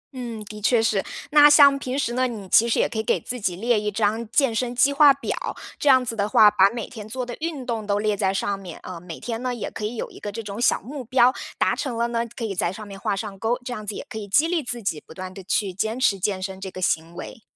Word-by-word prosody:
嗯， 235 -4 -6
的 210 0 -9
确 235 +2 +3
是。 215 -3 +1 0.3
那 295 0 +8
像 285 -2 +7
平 260 0 -3
时 240 -4 -1
呢， 255 +1 +1
你 215 -6 -7
其 230 +5 +5
实 - - +1
也 - - +3
可 225 - -7
以 - - -1
给 - - +1
自 250 -1 -6
己 185 -3 -1
列 230 +4 +1
一 210 0 -2
张 215 +2 0
健 265 0 +2
身 245 +2 -2
计 275 +3 +4
划 285 0 +7
表， 275 - -4 0.5
这 290 - +2
样 260 -1 +6
子 230 -1 -3
的 205 -1 -1
话， 210 +1 +7
把 195 -1 +5
每 230 0 -5
天 215 -4 -9
做 255 +2 -3
的 240 -1 -6
运 310 -5 -4
动 230 -3 -3
都 200 0 +1
列 210 -1 +1
在 195 -2 +1
上 200 +1 -1
面。 180 -4 -9
呃， 180 -2 -7
每 170 -2 -9
天 230 -1 -4
呢， 250 -1 -2
也 235 - -4
可 - - -7
以 225 - -4
有 - - -4
一 - - -13
个 205 - -5
这 225 +3 -5
种 205 +2 -6
小 - - +3
目 275 +1 -7
标。 250 +1 +4 0.2
达 - - +2
成 250 -6 -3
了 235 - +1
呢， 235 0 -1
可 235 - -4
以 205 - -3
在 175 -1 0
上 210 +2 -9
面 195 -1 -9
画 200 - -1
上 200 -1 -6
钩， 235 +4 0
这 245 - -4
样 215 -2 -7
子 205 - -3
也 - - -6
可 220 - -7
以 205 - -7
激 290 +11 +3
励 340 -2 0
自 240 -1 -3
己 160 -6 -2
不 - - -13
断 185 +1 -7
地 195 - -10
去 190 0 0
坚 220 +6 -2
持 200 -6 +2
健 195 0 -1
身 190 0 -6
这 195 - -5
个 - - -8
行 165 -1 -1
为。 185 - -8
225 Hz, 315 characters per minute, -23 LUFS, 200-250 Hz, 0.5 s, 那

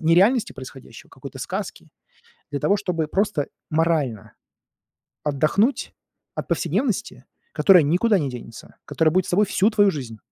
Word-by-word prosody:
нереальности 195 +9 +3
происходящего, 130 0 -12
какой-то - - -10
сказки. - - -6 0.6
Для 140 -1 -3
того, 200 - +2
чтобы 180 -6 -2
просто 190 -4 0 0.2
морально 155 -9 0 0.9
отдохнуть 155 - +1 0.4
от - - -5
повседневности, 185 - -1 0.3
которая 170 +2 +6
никуда 185 +7 +2
не 140 - -2
денется, 120 -2 -10
которая 160 -1 +1
будет 185 -1 +2
с - - -6
тобой 205 +4 +3
всю 205 +1 +2
твою 205 -3 +3
жизнь. 125 -7 -7
165 Hz, 135 wpm, -23 LUFS, 145-200 Hz, 0.9 s, которая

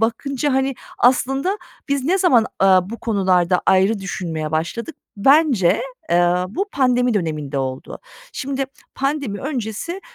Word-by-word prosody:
bakınca, 265 +5 -1
hani, 265 +1 +1 0.2
aslında 270 - +2 0.3
biz 280 -2 0
ne 365 +7 +2
zaman, 255 - +4
aaa, 190 0 +4
bu 230 - -6
konularda 185 -5 +2
ayrı 190 +3 +3
düşünmeye 165 -5 -4
başladık? 170 - -3 0.2
Bence, 270 - +4 0.3
eee, 175 +1 +3
bu 390 - -3
pandemi 250 -3 +2
döneminde 155 -7 -2
oldu. 130 -1 -5 0.3
Şimdi, 275 0 -3 0.3
pandemi 275 -7 -2
öncesi 270 - -4
230 Hz, 125 wpm, -20 LUFS, 180-275 Hz, 0.3 s, zaman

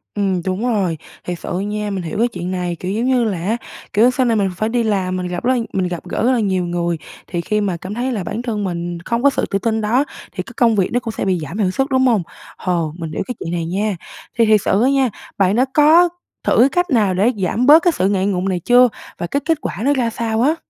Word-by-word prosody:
Ừm, 195 -3 0
đúng 190 +3 -2
rồi, 195 -8 0 0.3
thiệt 175 -1 -4
sự 180 - -4
nha, 210 +1 -3
mình 195 -3 -3
hiểu 165 +2 -4
cái 235 - +4
chuyện 180 -5 -5
này, 180 -2 -2
kiểu, 185 - -3
giống 225 +4 -1
như 255 -2 +3
là 210 -5 -1
á, 200 +8 -1 0.4
kiểu, 230 +4 +5
sau 255 0 +1
này 230 -2 +2
mình 200 -3 +1
phải 215 +4 0
đi 240 0 +1
làm, 190 -4 0
mình 180 -1 -3
gặp 180 0 -4
rất 255 +2 +3
là 250 - +1
mình 185 -1 0
gặp 175 -2 -5
gỡ - - -3
rất 250 - +4
là 250 - +2
nhiều 190 -4 0
người, 175 -1 -1 0.3
thì 175 -2 -3
khi 210 +4 0
mà 190 -4 -1
cảm 185 +4 -7
thấy 245 +4 -2
là 210 -6 -2
bản 210 +6 -4
thân 225 -4 -3
mình 175 -2 -3
không 235 +1 -1
có 280 - +7
sự 275 - -1
tự 195 - -1
tin 220 +1 0
đó, 240 +7 +2 0.3
thì - - -4
cái - - -13
công 235 -3 +4
việc 190 -3 +1
nó 245 - +1
cũng 235 -2 -5
sẽ - - -1
bị 185 -2 +1
giảm 155 +5 -6
hiệu 195 -4 +1
suất, 270 +8 0
đúng 260 -1 +3
hông? 220 -7 +2 0.3
Hồ, 170 -4 -1
mình 165 -3 -5
hiểu - - -2
cái 250 - -4
chuyện 165 - -5
này 170 -1 -1
nha. 200 +4 -1 0.4
Thì 230 - +5
thiệt 215 -2 +4
sự 195 - +2
á 260 - +4
nha, 270 -2 +2 0.3
bạn 195 0 +3
đã 250 +3 +3
có 320 +4 +6 0.3
thử - - +2
cái 255 +4 +6
cách 355 +5 0
nào 215 - +2
để 200 +7 +3
giảm 200 +6 0
bớt 305 +4 +8
cái 350 - +4
sự 190 - +1
ngại 195 -2 +1
ngùng 190 -1 0
này 180 -2 -1
chưa? 245 +7 +5 0.3
Và 175 - -3
cái 280 - 0
kết 325 -1 +2
quả - - -4
nó 285 - +4
ra 250 -4 0
sao 225 -1 -1
á? 295 +6 +3
210 Hz, 285 wpm, -19 LUFS, 185-245 Hz, 0.4 s, bớt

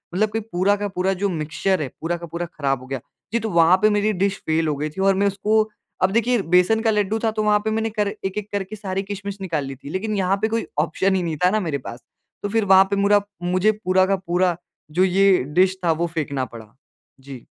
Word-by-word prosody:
मतलब 215 +3 +2
कि 225 - -1
पूरा 200 -2 +1
का 205 0 -3
पूरा 190 0 -1
जो 200 - +2
मिक्सचर 165 +2 -1
है, 140 - -2
पूरा 175 +2 -1
का 170 - -8
पूरा 170 +2 -4
खराब 140 -5 -2
हो 130 - -12
गया। 135 -1 -3 0.3
जी, 235 - +2
तो 220 -1 -3
वहाँ 170 +1 +5
पे 215 - +5
मेरी 210 +1 +1
डिश 195 +1 0
फ़ेल 160 0 +1
हो 150 - 0
गई 150 +2 -2
थी 160 +6 -6
और 195 0 +4
मैं 200 +1 +2
उसको 210 +2 +2 0.4
अब 185 +1 +3
देखिए 235 +1 +2
बेसन 180 +5 +5
का 225 - +2
लड्डू 210 +1 0
था 220 - +2
तो 215 0 -2
वहाँ 210 0 +3
पे 220 - 0
मैंने 225 +1 0
कर 210 -2 -1 0.2
एक-एक 200 +2 -4
करके 200 +1 -3
सारी 195 -2 -3
किशमिश 200 0 -6
निकाल 165 -7 -2
ली 135 0 -6
थी। 140 +2 -11
लेकिन 210 +6 -2
यहाँ 190 +1 +1
पे 220 - +2
कोई 230 +1 -1
ऑप्शन 190 0 +1
ही 185 - 0
नहीं 160 -3 -3
था - - +6
ना 215 +2 +1
मेरे 160 -7 -2
पास। 120 - -8 0.4
तो 205 - -1
फिर 225 0 +1
वहाँ 190 0 +7
पे 200 - +2
मुरा 200 +1 +4 0.2
मुझे 185 +4 +2
पूरा 185 0 +4
का 195 +1 +1
पूरा 180 -1 0 0.4
जो 180 +4 +2
ये 195 +1 +4 0.3
डिश 190 0 +2
था 165 - +4
वो 170 - +1
फेंकना 140 -4 -2
पड़ा। 115 -1 -13 0.4
जी। 135 -2 -11
190 Hz, 250 wpm, -22 LUFS, 170-205 Hz, 0.4 s, वहाँ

